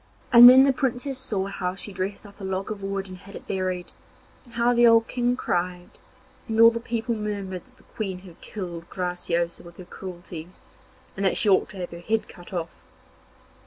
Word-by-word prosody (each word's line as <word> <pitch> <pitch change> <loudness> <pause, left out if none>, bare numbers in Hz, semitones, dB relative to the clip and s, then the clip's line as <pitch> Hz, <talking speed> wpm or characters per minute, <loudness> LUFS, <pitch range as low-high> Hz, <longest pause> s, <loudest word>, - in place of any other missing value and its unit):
And 240 +1 +12
then 260 +1 +8
the 275 0 +4
Princess 260 +1 -2
saw 200 -7 -2
how 185 -2 -3
she 195 +1 -7
dressed 190 +3 -4
up 200 0 -14
a - - -7
log 190 +1 -3
of 205 -2 -6
wood 195 0 -3
and 185 -1 -10
had 200 +1 -13
it - - -10
buried, 185 -2 -3 0.5
and 240 - -16
how 235 +1 +3
the 240 0 +6
old 230 0 +5
King 245 0 0
cried, 180 -5 -2 0.6
and 220 -1 -1
all 230 0 +9
the 230 - -3
people 235 0 -2
murmured 200 -4 -4
that - - -27
the - - -22
Queen 190 -4 -5
had 180 -3 -15
killed 175 -4 -7
Graciosa 175 -2 -2
with 170 0 -14
her 185 - -10
cruelties, 175 -1 -9 0.5
and 195 - -3
that 190 - +2
she 210 - +2
ought 190 - +3
to 195 - -11
have 180 -1 -5
her 170 - -8
head 220 +5 -1
cut 175 +2 -12
off. 170 -3 -5
195 Hz, 205 wpm, -25 LUFS, 180-230 Hz, 0.6 s, And